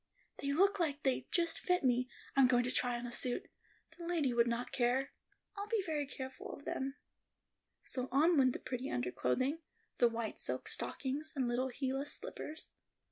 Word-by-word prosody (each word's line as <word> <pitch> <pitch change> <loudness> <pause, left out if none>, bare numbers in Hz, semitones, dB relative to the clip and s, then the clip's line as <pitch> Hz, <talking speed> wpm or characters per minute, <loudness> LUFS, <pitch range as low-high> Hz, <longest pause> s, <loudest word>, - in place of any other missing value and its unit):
"They 280 - -1
look 390 +7 +4
like 295 -3 0
they'd 265 -2 0
just 335 -1 +2
fit 360 -2 +1
me—I'm 255 +1 +2
going 245 -1 +4
to 250 - -1
try 245 -1 +1
on 240 - -5
a 240 - -5
suit—the 250 +7 -2
lady 330 -7 +1
would 235 0 +4
not 235 +1 -1
care—I'll 270 - -2
be 430 -2 +1
very 300 -3 -1
careful 260 -1 -6
of 285 - -10
them." 270 +1 -2 0.9
So 255 0 -3
on 315 +6 +5
went 260 -4 +5
the - - -4
pretty 255 +1 -4
underclothing, 125 - 0 0.4
the 240 - +6
white 230 -1 -3
silk - - -2
stockings, 285 +3 -2
and 260 -3 +1
little 245 +2 +1
heelless 270 +2 -2
slippers. 315 +1 -6
265 Hz, 165 wpm, -35 LUFS, 245-305 Hz, 0.9 s, the